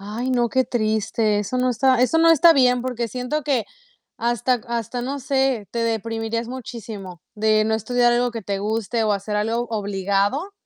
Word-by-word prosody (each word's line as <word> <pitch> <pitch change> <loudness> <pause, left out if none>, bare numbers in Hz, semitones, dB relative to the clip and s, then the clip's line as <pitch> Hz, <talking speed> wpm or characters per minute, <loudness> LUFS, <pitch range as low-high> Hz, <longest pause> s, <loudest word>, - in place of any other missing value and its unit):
Ay, 215 +6 -4
no, 240 -2 +1
qué 260 -1 +2
triste. 215 -2 0
Eso 210 +5 -3
no 255 0 +1
está 250 +1 +3
eso 325 +6 +2
no 330 0 +6
está 330 +1 +7
bien, 250 -3 +3
porque 240 -2 -3
siento 250 +6 -3
que 260 -5 0 0.5
hasta 240 +1 0
hasta 235 +1 -3
no 275 +3 -3
sé, 265 -5 0
te 235 - -4
deprimirías 230 0 -2
muchísimo 215 -8 -8
de 215 0 +2
no 220 0 +1
estudiar 240 +2 +2
algo 245 0 +1
que 230 -1 -6
te 195 0 -3
guste 220 +2 -1
o 215 - +2
hacer 205 +1 -2
algo 230 +3 -1
obligado. 205 - -1
235 Hz, 180 wpm, -22 LUFS, 215-250 Hz, 0.5 s, está